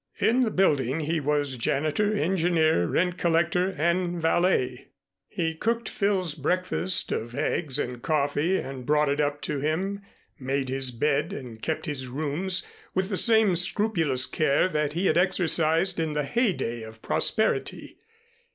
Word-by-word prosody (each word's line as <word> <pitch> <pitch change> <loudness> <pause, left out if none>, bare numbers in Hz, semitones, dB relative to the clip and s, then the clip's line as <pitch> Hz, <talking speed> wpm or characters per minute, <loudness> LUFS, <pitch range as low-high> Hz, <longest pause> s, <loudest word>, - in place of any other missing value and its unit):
In 245 +3 +2
the 240 - +2
building 150 - +1
he 160 +2 -1
was 145 -2 -1
janitor, 155 - 0
engineer, 165 - +2
rent 180 - 0
collector, 170 +2 +1
and 170 +2 0
valet. 160 -7 +1 0.4
He 165 -2 -2
cooked 230 +7 -1
Phil's 190 -5 0
breakfast 180 +4 -1
of 120 +2 -3
eggs 150 -1 -1
and 125 -4 -3
coffee 155 +4 +1
and 135 -1 -6
brought 150 +2 +2
it 145 +1 +1
up 145 0 -1
to 140 - -2
him, 185 +8 -2 0.4
made 135 0 -2
his 135 0 0
bed 145 +8 0
and 120 - -8
kept 160 - -3
his 140 -5 -4
rooms 155 +8 -2 0.3
with 190 +1 0
the 200 - -1
same 220 -2 +4
scrupulous 170 - +1
care 140 +4 +1
that 150 -3 -1
he 175 +4 -1
had 175 - +3
exercised 170 -1 +2
in 160 -2 -1
the 150 0 -1
heydey 165 - -1
of 110 0 -11
prosperity. 220 -1 0
160 Hz, 150 wpm, -26 LUFS, 140-185 Hz, 0.4 s, same